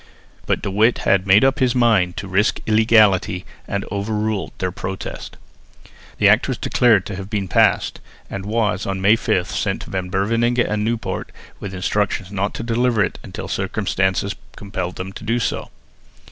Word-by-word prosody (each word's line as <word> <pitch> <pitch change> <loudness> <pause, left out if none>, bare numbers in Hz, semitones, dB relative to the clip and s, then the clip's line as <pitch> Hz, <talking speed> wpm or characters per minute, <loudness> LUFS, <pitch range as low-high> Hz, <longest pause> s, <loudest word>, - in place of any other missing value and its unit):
But - - 0
De 100 - -2
Witt 110 +5 +3
had 100 0 +3
made 100 +6 +6
up 135 0 +2
his 130 -2 +2
mind 105 -8 +3
to 100 - -5
risk 100 +4 +1
illegality, 110 -4 +3 0.2
and 100 0 -2
overruled 105 0 -2
their 90 -1 -2
protest. 95 +1 -6 0.8
The - - +4
Act - - +4
was - - -2
declared 115 -6 +3
to 105 - -5
have 95 0 -7
been 100 -3 -2
passed - - +2 0.3
and 95 - -6
was 105 -2 -1
on 95 -1 -2
May 100 +4 +5
5 90 -4 -1
sent 95 -1 -2
to - - -11
Van 95 -1 -3
Beverningh 115 +6 +1
and 105 -3 +1
Nieuwpoort 115 +1 -3 0.3
with 95 -2 -6
instructions 100 +1 -1
not 100 0 -2
to - - -4
deliver 115 -2 +2
it - - -3
until - - -7
circumstances 95 +1 -1 0.2
compelled 95 -3 -5
them 95 +1 -6
to - - -9
do 115 +3 0
so. 120 - -2
100 Hz, 175 wpm, -20 LUFS, 95-110 Hz, 0.8 s, made